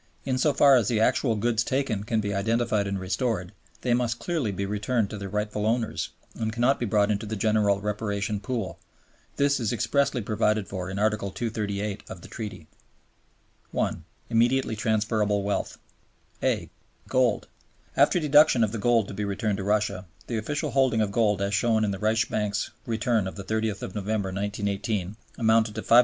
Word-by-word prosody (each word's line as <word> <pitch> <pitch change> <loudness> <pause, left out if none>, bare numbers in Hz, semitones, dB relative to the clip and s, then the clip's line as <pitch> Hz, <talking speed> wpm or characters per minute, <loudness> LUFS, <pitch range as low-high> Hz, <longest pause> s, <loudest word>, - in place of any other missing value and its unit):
In 130 -1 0
so 150 - +4
far 140 -1 +6
as 115 -4 +1
the 115 -2 +1
actual 115 +1 +2
goods 115 +2 +1
taken 130 -7 -1
can 110 +1 0
be 100 -1 -2
identified 110 0 +1
and 100 0 -2
restored, 95 0 -1 0.3
they 125 - +1
must 120 -1 +1
clearly 155 - -1
be 100 +1 -3
returned 105 +2 0
to 110 - -5
their 100 -1 -5
rightful 105 +1 -1
owners, 115 0 -1 0.2
and 110 -1 -2
cannot 120 +4 +2
be 120 - -1
brought 105 0 +3
into 105 +1 -2
the 110 - -3
general 105 -2 +2
reparation 105 0 -2
pool. 105 -1 -4 0.6
This 140 -1 +2
is 115 -4 0
expressly 125 +3 +1
provided 105 -1 +1
for 95 -2 -5
in 95 - -4
Article 105 -1 +1
238 105 -1 -3
of 90 - -8
the - - -11
Treaty. 105 -7 -7 1.0
1. 80 - -1 0.3
Immediately 120 +1 +2
Transferable 105 -1 +1
Wealth 100 0 -2 0.6
(a) - - 0 0.4
Gold. 130 -4 +2 0.5
After - - +4
deduction 150 -5 +5
of 105 - +1
the 115 - -4
gold 115 -2 +3
to - - -7
be 105 +2 -3
returned 100 0 -1
to 100 - -4
Russia, 100 -2 0 0.2
the 115 -2 -2
official 145 +7 -2
holding 130 -5 +3
of 105 -2 0
gold 105 -2 +2
as 100 +1 -1
shown 110 +1 +2
in 100 - 0
the 95 - -4
Reichsbank's 110 -1 0 0.2
return 115 -3 +1
of 95 - -6
the 100 - -6
30th 110 0 -2
November, 105 -1 -1
1918, 100 0 -2 0.2
amounted 110 -2 +3
to 110 - -4
$577,089,500. 120 - +7
110 Hz, 175 wpm, -26 LUFS, 100-115 Hz, 1.0 s, $577,089,500